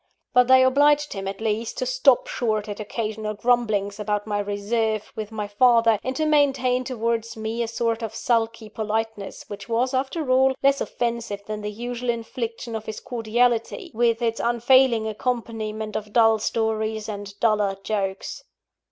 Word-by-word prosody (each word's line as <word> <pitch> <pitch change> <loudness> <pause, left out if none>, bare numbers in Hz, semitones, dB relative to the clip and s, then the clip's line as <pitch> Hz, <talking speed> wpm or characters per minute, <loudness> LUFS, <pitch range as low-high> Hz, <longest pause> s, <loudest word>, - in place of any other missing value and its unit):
But 250 0 +5
they 260 0 +7
obliged 290 +3 +3
him, 195 -1 -5
at 195 +2 -5
least, 220 +1 -2
to - - -1
stop - - +4
short 220 - -1
at 205 0 -6
occasional 215 0 -4
grumblings 215 -3 +1
about 210 0 -1
my 205 -1 -1
reserve 215 +1 -1
with 215 0 -5
my 210 -2 -4
father, 230 0 +4
and 260 +1 -3
to 310 - 0
maintain 270 -4 +2
towards 230 -2 -2
me 220 +2 -3
a 230 - -1
sort 230 0 -1
of 225 - -5
sulky 230 -2 0
politeness, 220 -1 -4
which 205 +2 -9
was, 245 +3 +1
after 265 +2 -1
all, 265 +1 +4
less 275 0 +3
offensive 230 -4 -3
than 215 0 -5
the 210 - -3
usual 240 +3 -5
infliction 230 0 -4
of 220 0 -6
his 215 - -5
cordiality, 235 0 0
with 230 +1 +1
its 230 -1 0
unfailing 240 -1 +3
accompaniment 220 -2 -3
of 210 -1 -5
dull 225 -2 +5
stories 220 0 -1
and 205 -1 -7
duller 210 -3 +2
jokes. 195 -2 -3
225 Hz, 160 wpm, -24 LUFS, 215-245 Hz, -, they